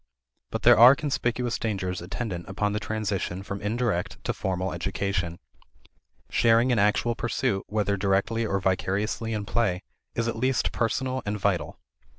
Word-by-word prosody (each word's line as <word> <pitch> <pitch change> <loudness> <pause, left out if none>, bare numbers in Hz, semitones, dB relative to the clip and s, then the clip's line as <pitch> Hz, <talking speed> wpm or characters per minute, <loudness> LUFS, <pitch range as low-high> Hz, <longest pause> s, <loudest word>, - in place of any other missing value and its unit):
But - - -4
there - - +7
are 125 +4 +10
conspicuous 125 -5 -1
dangers 95 -5 -2
attendant 90 -1 -5
upon 105 +1 -1
the 105 - -1
transition 100 -4 -3
from 100 0 -5
indirect 105 -3 -1
to - - -1
formal 95 -1 -2
education. 90 -1 -2 0.9
Sharing 115 +2 +4
in 120 - +2
actual 105 +3 +2
pursuit, 115 -3 -1
whether 105 -1 0
directly 100 +4 +1
or 100 -3 0
vicariously 95 +4 -1
in 105 -2 -2
play, 100 -6 0 0.3
is 115 0 0
at 115 - -1
least 130 +1 +1
personal 130 +3 -1
and 105 +1 -2
vital. 90 -6 -1
105 Hz, 150 wpm, -26 LUFS, 95-115 Hz, 0.9 s, are